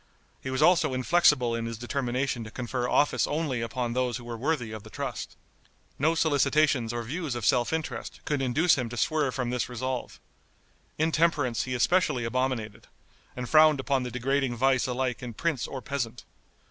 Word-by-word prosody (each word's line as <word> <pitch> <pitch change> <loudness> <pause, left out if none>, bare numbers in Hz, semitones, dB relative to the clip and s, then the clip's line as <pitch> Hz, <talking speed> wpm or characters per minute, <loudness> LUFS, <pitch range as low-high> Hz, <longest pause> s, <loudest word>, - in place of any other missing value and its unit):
He 130 - -5
was 130 0 +1
also 175 -7 +4
inflexible 130 -3 +3
in 115 0 -2
his 115 -1 -5
determination 125 0 -2
to 110 - -8
confer 125 +1 -3
office 145 - +2
only 145 -5 -1
upon 115 +1 -2
those 125 -1 0
who 120 - -11
were 120 0 -6
worthy 125 -2 -1
of 110 -1 -6
the - - -13
trust. - - -5 0.6
No 160 +4 +2
solicitations 145 -5 +2
or 120 0 -3
views 150 +2 -4
of 120 -3 -3
self 120 -2 +2
interest 160 -1 -4
could 145 -2 -1
induce 145 +5 +3
him 120 -2 -2
to 120 - -7
swerve 145 +2 +1
from 125 -2 -2
this 125 -1 -1
resolve. 125 +1 -4 0.8
Intemperance 155 -6 +1
he 130 -1 -3
especially 130 -3 +2
abominated, 120 -3 -2 0.5
and 125 -1 -4
frowned 155 -1 +6
upon 135 0 0
the 125 - -3
degrading 130 +1 0
vice 130 +1 +2
alike 125 -1 -2
in 120 -3 -7
prince 155 -2 -1
or 130 -2 -7
peasant. 125 -4 -4
130 Hz, 175 wpm, -27 LUFS, 120-145 Hz, 0.8 s, frowned